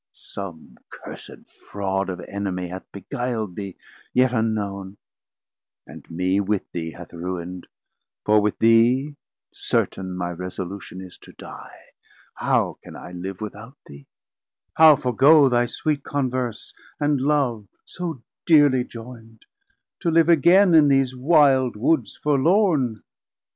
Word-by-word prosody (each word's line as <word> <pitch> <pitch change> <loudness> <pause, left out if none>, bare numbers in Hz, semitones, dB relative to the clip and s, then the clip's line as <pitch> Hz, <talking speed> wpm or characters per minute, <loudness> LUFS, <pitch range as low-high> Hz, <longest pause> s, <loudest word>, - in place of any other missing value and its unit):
som 90 -5 -10
cursed - - -11
fraud 95 -1 -4
Of 90 - -4
Enemie 95 -3 -4
hath 95 +1 -9
beguil'd 110 0 -4
thee, 100 -3 -6 0.4
yet 125 0 +3
unknown, 100 -4 -2 0.9
And - - -13
mee 90 +3 0
with 100 0 -1
thee 80 -2 -5
hath 85 0 -12
ruind, 90 +1 -6 0.6
for 105 0 +4
with 105 0 -1
thee 120 +6 +3 0.4
Certain 95 -1 -2
my 90 -1 -3
resolution 90 +2 -7
is 95 -2 -12
to - - -16
Die; - - -12 0.5
How - - 0
can - - -12
I - - -10
live 90 +2 -7
without 110 +5 -8
thee, 70 -1 -14 0.7
how 160 -1 +7
forgoe 135 +4 +4
Thy 120 0 +2
sweet 145 +3 -2
Converse 130 -4 -3 0.3
and 145 -2 +1
Love 130 -7 0 0.2
so 165 -8 -6 0.2
dearly 145 -6 +5
joyn'd, 115 -2 -12 0.5
To 170 - -1
live 165 0 +3
again 175 +4 +5
in 155 -2 +6
these 135 -2 +2
wilde 135 -3 +3
Woods 115 -2 0
forlorn? 150 - +1
115 Hz, 125 wpm, -23 LUFS, 95-140 Hz, 0.9 s, how